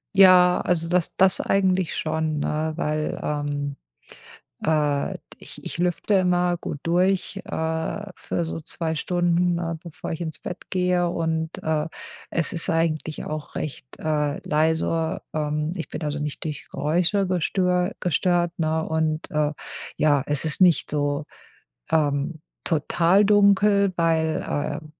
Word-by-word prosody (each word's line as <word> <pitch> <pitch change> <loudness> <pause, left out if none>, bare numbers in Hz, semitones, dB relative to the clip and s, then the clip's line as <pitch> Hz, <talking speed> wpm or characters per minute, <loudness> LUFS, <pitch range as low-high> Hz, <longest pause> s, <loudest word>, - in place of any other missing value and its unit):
Ja, 185 -2 +7
also 165 -2 0
das 180 -1 0
das 190 0 +4
eigentlich 185 -3 +1
schon, 155 -1 -1
ne, 155 +2 -1
weil, 155 -1 -1
ähm, 145 -1 -2 0.9
äh, 150 -2 +1
d - - -28 0.2
ich - - -12
ich - - -4
lüfte 180 +4 0
immer 180 -2 +3
gut 150 -3 -6
durch, 180 +3 +1
äh, 160 +5 -2
für 170 - -3
so 165 0 -5
2 160 +1 -3
Stunden, 175 +1 +1
ne, 165 -1 -3
bevor 165 -1 -7
ich 160 - -4
ins 160 -2 -4
Bett 180 - -8
gehe 180 -1 +1
und, 160 -1 -2
äh, 155 0 0 0.4
es 165 -2 0
ist 165 - 0
eigentlich 160 -2 -1
auch 155 -1 -6
recht, 140 -3 -6
äh, 150 -2 0
leise. 160 +1 +1
Ähm, 150 +1 -1
ich 165 - -5
bin - - -6
also 150 -1 -2
nicht 150 +1 -4
durch 150 -2 -5
Geräusche 175 +6 +1
gestö 180 0 +1
gestört, 175 0 +1
ne, 160 -1 0
und, 160 0 -1
äh, 150 -1 +1 0.5
ja, 145 -3 +3
es 145 0 0
ist 155 +4 0
nicht 180 -3 +4
so, 145 0 -1 0.6
ähm, 150 0 0 0.2
total 170 +5 +3
dunkel, 200 -1 +4
weil, 160 -2 +1
äh, 145 +1 -3
160 Hz, 140 wpm, -24 LUFS, 155-180 Hz, 0.9 s, Ja